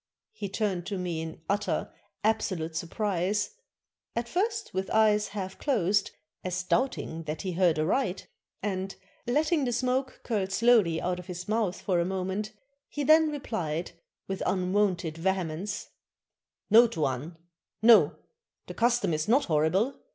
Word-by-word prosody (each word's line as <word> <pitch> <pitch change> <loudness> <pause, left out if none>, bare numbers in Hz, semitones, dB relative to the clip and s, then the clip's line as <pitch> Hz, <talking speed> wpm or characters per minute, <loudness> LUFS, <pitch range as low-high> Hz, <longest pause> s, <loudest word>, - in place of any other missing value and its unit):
He 205 - -5
turned 195 -4 -1
to 200 -1 -2
me 175 -3 -2
in 160 0 -7
utter, 205 +1 -1 0.3
absolute 185 -7 0
sur 170 - -3
prise, 205 +1 -1 0.6
at 235 0 -1
first 430 - -1
with 190 0 -2
eyes 210 -1 +3
half 190 -2 -6
closed, 205 - +1 0.3
as 185 -1 -2
doubting 185 -7 -1
that 155 +4 -4
he 190 - -2
heard 175 -2 +3
aright, 185 - 0 0.4
and 195 -1 -2 0.3
letting 300 +4 +2
the 245 - 0
smoke 255 +2 -1
curl 205 -5 -1
slowly 195 -5 +4
out 180 +1 -2
of 180 - -10
his 180 0 -6
mouth 215 -4 0
for 180 -3 0
a - - +3
moment, 190 +3 -2 0.4
he 290 - -3
then 315 +2 +6
replied, 180 - -3 0.4
with 195 0 -4
un 185 -1 0
wonted 180 -6 +1
vehemence: 185 +2 -2 0.8
"No, 235 +3 +8
Tuan! 155 - -2 0.5
No! 230 -1 +7 0.5
the - - -7
custom 235 -6 +2
is 155 +1 -1
not 255 +6 +4
horrible. 170 - +1
195 Hz, 145 wpm, -28 LUFS, 175-230 Hz, 0.8 s, No